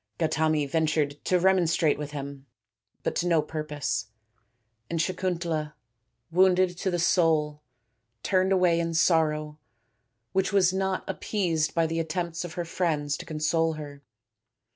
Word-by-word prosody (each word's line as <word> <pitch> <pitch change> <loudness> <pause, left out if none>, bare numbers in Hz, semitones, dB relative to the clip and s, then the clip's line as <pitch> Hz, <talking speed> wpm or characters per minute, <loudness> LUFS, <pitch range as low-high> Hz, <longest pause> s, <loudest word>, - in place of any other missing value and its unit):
Gautami 155 -1 +1
ventured 150 -1 0
to 185 - +3
remonstrate 170 -5 +2
with 150 -1 -4
him, 140 -1 -7 0.6
but - - -1
to 175 - 0
no 170 -2 +4
purpose, 145 -9 -3 0.8
and 165 - -2
Sakuntala, 170 -4 -2 0.6
wounded 185 0 +4
to 190 - 0
the 175 - 0
soul, 160 -4 +2 0.6
turned 190 0 +2
away 180 -3 +3
in 165 -1 -2
sorrow 155 -3 +2 0.7
which 190 +1 +1
was 185 -3 +3
not 190 0 -1
appeased 170 -7 -1
by 165 -1 +3
the 165 +1 -2
attempts 165 +1 -3
of 175 -3 -7
her 175 - -3
friends 155 -4 -1
to - - -10
console 160 +1 0
her. 145 -2 -9
165 Hz, 135 wpm, -27 LUFS, 150-180 Hz, 0.8 s, no